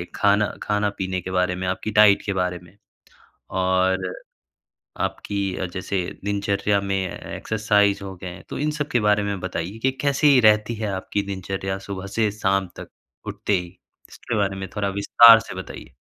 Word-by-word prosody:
खाना 105 Hz, +1 st, +3 dB, 0.2 s
खाना 105 Hz, 0 st, 0 dB
पीने 95 Hz, -1 st, -2 dB
के 95 Hz, -, -6 dB
बारे 90 Hz, 0 st, +1 dB
में, 90 Hz, 0 st, -4 dB
आपकी 95 Hz, +4 st, -3 dB
डाइट 105 Hz, -1 st, +6 dB
के 100 Hz, -, -1 dB
बारे 90 Hz, -1 st, -1 dB
में। 90 Hz, +3 st, -19 dB, 0.7 s
और 95 Hz, 0 st, +1 dB, 1.0 s
आपकी 100 Hz, -2 st, -3 dB
अ, -, -, -3 dB
जैसे 95 Hz, 0 st, -2 dB, 0.2 s
दिनचर्या 100 Hz, 0 st, 0 dB
में 100 Hz, 0 st, -1 dB, 0.4 s
एक्सरसाइज़ 105 Hz, -2 st, +1 dB
हो 95 Hz, -1 st, -7 dB
गए, 90 Hz, +1 st, -9 dB
तो -, -, -5 dB
इन 150 Hz, +1 st, 0 dB
सब 150 Hz, -1 st, -3 dB
के 120 Hz, -, +3 dB
बारे 105 Hz, -1 st, +2 dB
में 100 Hz, -2 st, -3 dB
बताइए 95 Hz, +3 st, -4 dB
कि 130 Hz, +3 st, +1 dB
कैसी 140 Hz, -1 st, +4 dB
रहती 105 Hz, +1 st, +4 dB
है, 110 Hz, -1 st, -3 dB
आपकी 95 Hz, +2 st, -2 dB
दिनचर्या 95 Hz, 0 st, -4 dB
सुबह 100 Hz, 0 st, -5 dB
से 110 Hz, -2 st, +2 dB
शाम 95 Hz, -2 st, 0 dB
तक -, -, -9 dB, 0.4 s
उठते 105 Hz, -, -2 dB
ही, 90 Hz, -, -7 dB, 0.4 s
इसके 115 Hz, -, -5 dB
बारे 100 Hz, -1 st, 0 dB
में 95 Hz, 0 st, -5 dB
थोड़ा 100 Hz, -1 st, -1 dB
विस्तार 115 Hz, +3 st, +7 dB
से 100 Hz, -5 st, -9 dB
बताइए? 95 Hz, -8 st, -9 dB
100 Hz, 170 wpm, -23 LUFS, 95-105 Hz, 1.0 s, विस्तार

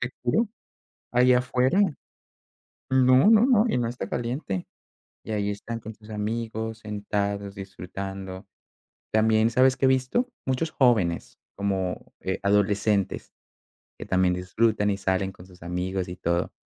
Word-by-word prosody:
Te 125 Hz, -, -1 dB
juro 220 Hz, -, +2 dB, 0.6 s
ahí 125 Hz, +1 st, +5 dB
afuera 125 Hz, +8 st, +2 dB, 1.1 s
No, 130 Hz, +8 st, +6 dB
no, 225 Hz, +1 st, +6 dB
no, 240 Hz, -4 st, +4 dB
y -, -, +1 dB
no 120 Hz, -2 st, 0 dB
está 120 Hz, -4 st, -5 dB
caliente. 120 Hz, -, -3 dB, 0.6 s
Y 110 Hz, -, -5 dB
ahí 105 Hz, -1 st, 0 dB
están 115 Hz, +3 st, -5 dB
con 110 Hz, 0 st, -8 dB
sus 105 Hz, +1 st, -16 dB
amigos, 110 Hz, +1 st, -3 dB
sentados, 100 Hz, -1 st, -3 dB
disfrutando. 95 Hz, 0 st, -7 dB, 0.7 s
También, 110 Hz, +1 st, +3 dB
¿sabes 130 Hz, +2 st, +4 dB
que 135 Hz, -, +2 dB
he -, -, +5 dB
visto? 130 Hz, -, +1 dB, 0.2 s
Muchos 130 Hz, +5 st, 0 dB
jóvenes 110 Hz, -, +1 dB, 0.2 s
como, 95 Hz, -2 st, -2 dB
eh, 95 Hz, -, -2 dB
adolescentes 100 Hz, 0 st, +1 dB, 0.7 s
que -, -, -7 dB
también 95 Hz, -1 st, +2 dB
disfrutan 105 Hz, +3 st, +1 dB
y 100 Hz, -, 0 dB
salen 95 Hz, 0 st, -1 dB
con 90 Hz, -, -15 dB
sus 90 Hz, -2 st, -18 dB
amigos 90 Hz, +2 st, -3 dB
y 90 Hz, -, -6 dB
todo. 85 Hz, 0 st, -1 dB
105 Hz, 140 wpm, -26 LUFS, 95-125 Hz, 1.1 s, No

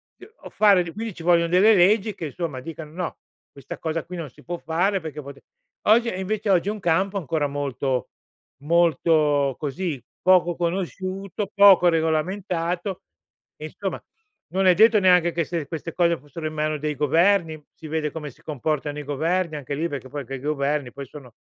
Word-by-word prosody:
t -, -, -16 dB
o -, -, -7 dB
fare 200 Hz, -4 st, +4 dB
d 165 Hz, -1 st, -8 dB
quindi 225 Hz, +2 st, -5 dB
ci 170 Hz, -, -11 dB
voglion 170 Hz, -1 st, +3 dB
delle 195 Hz, +5 st, +5 dB
leggi 205 Hz, +3 st, +3 dB
che, 170 Hz, -4 st, -5 dB
insomma, 150 Hz, -2 st, -5 dB
dicano: 155 Hz, +2 st, -8 dB
"No, 175 Hz, +1 st, -5 dB, 0.3 s
questa 140 Hz, -3 st, -9 dB
cosa 160 Hz, 0 st, -2 dB
qui 180 Hz, -, -8 dB
non 160 Hz, -4 st, -6 dB
si -, -, -20 dB
può 175 Hz, +1 st, -5 dB
fare 180 Hz, +5 st, 0 dB
perché 155 Hz, -2 st, -7 dB
pote" 140 Hz, 0 st, -11 dB, 0.5 s
oggi 230 Hz, +2 st, +5 dB
e, 185 Hz, -, -4 dB
invece, 205 Hz, +2 st, -1 dB
oggi 185 Hz, +1 st, +2 dB
è -, -, +1 dB
un 215 Hz, -, -6 dB
campo 190 Hz, +3 st, +1 dB
ancora 155 Hz, -4 st, -1 dB
molto 135 Hz, -3 st, -2 dB, 0.5 s
molto 155 Hz, -3 st, +2 dB
così, 150 Hz, 0 st, -3 dB, 0.2 s
poco 180 Hz, -1 st, +4 dB
conosciuto, 190 Hz, +3 st, -3 dB
poco 200 Hz, -3 st, +7 dB
regolamentato 175 Hz, +3 st, -1 dB, 0.5 s
e, -, -, -8 dB
insomma, -, -, -5 dB, 0.5 s
non 190 Hz, 0 st, +2 dB
è 180 Hz, -, +6 dB
detto 220 Hz, +1 st, +6 dB
neanche 180 Hz, -2 st, +4 dB
che 170 Hz, 0 st, -1 dB
se 165 Hz, -2 st, -3 dB
queste 165 Hz, +1 st, -6 dB
cose 170 Hz, -1 st, +2 dB
fossero 145 Hz, +3 st, -9 dB
in 155 Hz, -, -6 dB
mano 155 Hz, 0 st, -1 dB
a -, -, -5 dB
dei 150 Hz, +1 st, -2 dB
governi, 165 Hz, +3 st, +2 dB
si 160 Hz, -, -11 dB
vede 150 Hz, -1 st, -2 dB
come 150 Hz, -1 st, -6 dB
si -, -, -25 dB
comportano 150 Hz, 0 st, -3 dB
i -, -, -6 dB
governi, 160 Hz, +4 st, -1 dB
anche 145 Hz, -1 st, -5 dB
lì, 165 Hz, +4 st, -1 dB
perché 135 Hz, -4 st, -7 dB
poi 145 Hz, 0 st, -6 dB
che 135 Hz, -, -5 dB
i -, -, -7 dB
governi 145 Hz, -1 st, -1 dB
poi 140 Hz, +1 st, -8 dB
sono 130 Hz, -4 st, -13 dB
165 Hz, 195 wpm, -23 LUFS, 150-185 Hz, 0.5 s, poco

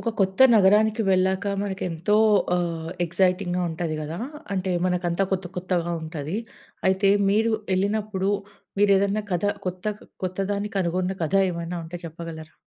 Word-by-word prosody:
ఒక 230 Hz, -, -2 dB
కొత్త 190 Hz, 0 st, +1 dB, 0.2 s
నగరానికి 215 Hz, +2 st, +4 dB
వెళ్ళాక 190 Hz, +1 st, +2 dB, 0.2 s
మనకెంతో 190 Hz, -1 st, -1 dB, 0.4 s
ఆహ్, 165 Hz, -2 st, -2 dB
ఎక్సైటింగ్‍గా 180 Hz, +1 st, +1 dB
ఉంటది 160 Hz, -1 st, -3 dB
కదా! 155 Hz, +3 st, -5 dB, 0.4 s
అంటే 190 Hz, -1 st, -1 dB
మనకంతా 180 Hz, 0 st, 0 dB
కొత్త 185 Hz, -1 st, -1 dB
కొత్తగా 175 Hz, -1 st, -1 dB
ఉంటది. 160 Hz, +2 st, -4 dB, 0.5 s
అయితే 190 Hz, +1 st, +3 dB, 0.2 s
మీరు 220 Hz, +3 st, +2 dB, 0.2 s
ఎళ్ళినప్పుడు 200 Hz, 0 st, 0 dB, 0.5 s
మీరేదైనా 200 Hz, +1 st, +3 dB
కథ 175 Hz, +2 st, 0 dB, 0.2 s
కొత్త 185 Hz, +2 st, -4 dB, 0.4 s
కొత్తదాన్ని 200 Hz, +3 st, -2 dB
కనుగొన్న 185 Hz, +1 st, 0 dB
కథ 160 Hz, -, -3 dB, 0.2 s
ఏమైనా 170 Hz, 0 st, -4 dB
ఉంటే 165 Hz, +2 st, -7 dB
చెప్పగలరా? 165 Hz, -1 st, -9 dB
185 Hz, 125 wpm, -24 LUFS, 170-200 Hz, 0.5 s, నగరానికి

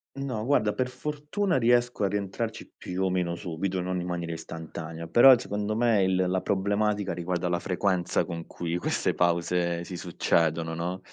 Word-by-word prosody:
No, 130 Hz, -6 st, -3 dB
guarda, 110 Hz, -6 st, +2 dB
per 130 Hz, -1 st, -1 dB
fortuna 150 Hz, +8 st, -2 dB
riesco 120 Hz, -2 st, +2 dB
a 100 Hz, -, +2 dB
rientrarci 105 Hz, +3 st, -4 dB
più 90 Hz, +1 st, -4 dB
o -, -, +1 dB
meno 90 Hz, -2 st, 0 dB
subito, 90 Hz, +2 st, -3 dB
non 90 Hz, 0 st, -2 dB
in 90 Hz, -, -5 dB
maniera 85 Hz, -1 st, -3 dB
istantanea, 80 Hz, 0 st, -7 dB
però 120 Hz, +9 st, +8 dB
secondo 105 Hz, -1 st, -2 dB
me 115 Hz, -3 st, +3 dB
il 95 Hz, 0 st, +2 dB
la 95 Hz, +1 st, 0 dB
problematica 100 Hz, 0 st, 0 dB
riguarda 90 Hz, +1 st, -2 dB
la 85 Hz, 0 st, 0 dB
frequenza 90 Hz, -1 st, 0 dB
con 85 Hz, -2 st, -6 dB
cui 85 Hz, -1 st, -4 dB
queste 90 Hz, -, 0 dB
pause 85 Hz, 0 st, +1 dB
si 90 Hz, -, -7 dB
succedono, 85 Hz, -2 st, 0 dB
no, 90 Hz, +3 st, -3 dB
95 Hz, 165 wpm, -27 LUFS, 85-110 Hz, -, però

